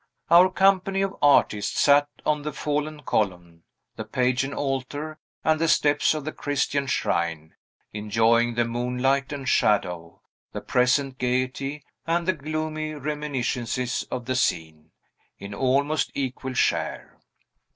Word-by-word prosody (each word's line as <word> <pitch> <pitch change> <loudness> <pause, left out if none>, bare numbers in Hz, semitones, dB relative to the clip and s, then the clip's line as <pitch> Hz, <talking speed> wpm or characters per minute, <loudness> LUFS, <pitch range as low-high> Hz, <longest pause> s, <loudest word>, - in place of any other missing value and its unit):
Our 175 +2 +7
company 195 +1 +2
of 195 0 -3
artists 125 -7 +3
sat 145 0 +5 0.2
on 150 -1 +1
the 150 +1 -4
fallen 150 +1 -3
column, 90 -7 -2 0.3
the - - -4
pagan 130 +2 0
altar, 145 +3 -4 0.2
and 160 0 +2
the 165 - +2
steps 145 0 +3
of 150 -2 -5
the 155 - -3
Christian 140 -1 -1
shrine, 85 - -1 0.4
enjoying 115 +3 +2
the 120 0 +2
moonlight 125 +4 0
and 140 -2 -5
shadow, 90 -8 0 0.3
the - - -5
present 130 +2 +1
gayety 130 +3 -2 0.2
and 170 +1 0
the 185 - +3
gloomy 155 0 -4
reminiscences 130 -4 -2
of 125 -1 -4
the 130 - -1
scene, 80 -9 -1 0.5
in 100 +1 -8
almost 140 +6 +1
equal 130 -1 -4
share. - - -1
135 Hz, 130 wpm, -25 LUFS, 120-150 Hz, 0.5 s, Our